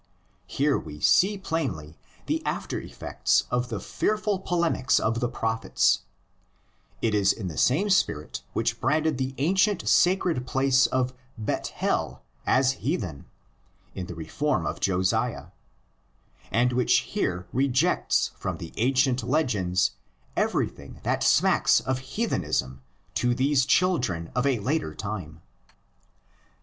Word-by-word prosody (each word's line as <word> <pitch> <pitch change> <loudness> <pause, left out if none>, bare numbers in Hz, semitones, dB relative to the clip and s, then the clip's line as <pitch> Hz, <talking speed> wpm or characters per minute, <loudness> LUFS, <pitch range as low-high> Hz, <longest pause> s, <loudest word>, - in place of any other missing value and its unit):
Here 140 0 +1
we 75 -1 -9
see 200 - +4
plainly 120 - -3 0.3
the - - -1
after - - -3
effects - - 0
of 125 0 0
the 110 -4 -3
fearful 210 - -1
polemics 170 -8 +1
of 115 +1 0
the 120 - 0
Prophets: 115 -1 +1 1.0
it 115 -2 +2
is 100 -2 +3
the 90 -7 -4
same 135 - +2
spirit 75 - 0
which - - -1
branded 150 +1 +1
the 130 0 -2
ancient 190 +6 +2
sacred 175 -8 +3
place 135 0 +3
of 130 0 0 0.2
Bethel 105 -2 -2 0.2
as 130 0 +4
heathen 100 - -3 0.7
(in 90 -2 -5
the 85 - -7
"reform" 130 - -1
of - - -3
Josiah) 95 -1 0 1.0
and 120 +3 +2
which 125 0 +3
here 90 +1 -1
rejects 135 +6 +1
from - - -3
the 85 - -9
ancient 130 +2 +2
legends 105 - +1 0.4
everything - - -2
that - - 0
smacks - - +4
of 130 -1 -2
heathen 170 - -2
ism 65 +1 -2 0.3
to 120 0 +1
these 135 +1 +2
children 130 - +1
of 125 +2 +1
a 135 -3 +2
later 130 - -1
time. 90 -7 -6
125 Hz, 125 wpm, -26 LUFS, 100-150 Hz, 1.0 s, see